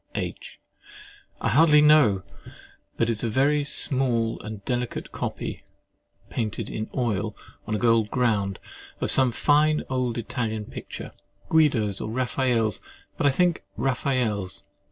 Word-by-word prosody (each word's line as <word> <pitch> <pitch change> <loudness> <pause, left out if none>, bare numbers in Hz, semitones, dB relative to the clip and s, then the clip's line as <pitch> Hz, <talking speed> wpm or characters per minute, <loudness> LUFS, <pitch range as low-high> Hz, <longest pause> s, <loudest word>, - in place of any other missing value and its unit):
H. - - -5 0.8
I - - +1
hardly 150 +5 +6
know; 150 -11 +5 0.7
but 115 - +2
it - - +1
is 110 - -2
a 115 - 0
very 145 +5 +2
small 130 -6 +2
and 105 -2 -8
delicate 125 -1 -3
copy - - -5 0.6
(painted 110 -3 -3
in 110 - -4
oil 110 -4 -1 0.3
on 110 - -1
a - - 0
gold 115 -1 +3
ground) 105 -6 0 0.4
of - - +1
some 130 -2 +4
fine 150 +4 +3
old 125 -2 -1
Italian 110 -2 -3
picture, - - -8 0.4
Guido's 125 -11 +2
or 110 - -4
Raphael's, 120 -3 0 0.3
but 145 - +1
I - - +6
think 175 +4 +1
Raphael's. 125 -8 -1
120 Hz, 135 wpm, -25 LUFS, 110-135 Hz, 0.8 s, hardly